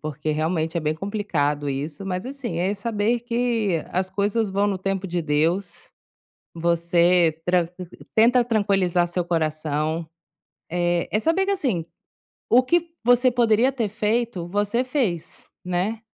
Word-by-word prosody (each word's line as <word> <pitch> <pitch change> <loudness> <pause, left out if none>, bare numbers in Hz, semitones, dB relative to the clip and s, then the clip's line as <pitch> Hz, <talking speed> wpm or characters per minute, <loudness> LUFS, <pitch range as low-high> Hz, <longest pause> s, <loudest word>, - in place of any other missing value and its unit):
porque 155 0 -4
realmente, 160 +1 -1
é - - +1
bem 155 0 0
complicado 155 -7 -1
isso, 145 +7 -4
mas 185 +4 -3
assim, 260 -11 -5
é 190 +4 0
saber 225 +2 0
que 230 -7 0
as 185 +1 -1
coisas 205 +2 0
vão 200 +2 +1
no 195 -2 -1
tempo 195 0 -2
de 175 -1 -2
Deus. 165 +4 -1 0.6
Você 170 0 +2
tranq 180 -1 +2 0.4
tenta 240 +3 +5
tranquilizar 195 -6 +1
seu 175 +1 -2
coração. 155 -1 -1 0.6
Eh, 175 0 0
é 215 - +1
saber 330 - +1
que 400 - +1
assim, 225 - -1 0.6
o 250 +3 +6
que 340 +5 +1
você 245 +1 +5
poderia 240 +1 +3
ter 235 -5 -1
feito, 215 -3 -1
você 205 +6 0
fez, 240 - -3 0.2
né. 185 +5 -1
190 Hz, 140 wpm, -23 LUFS, 170-230 Hz, 0.6 s, o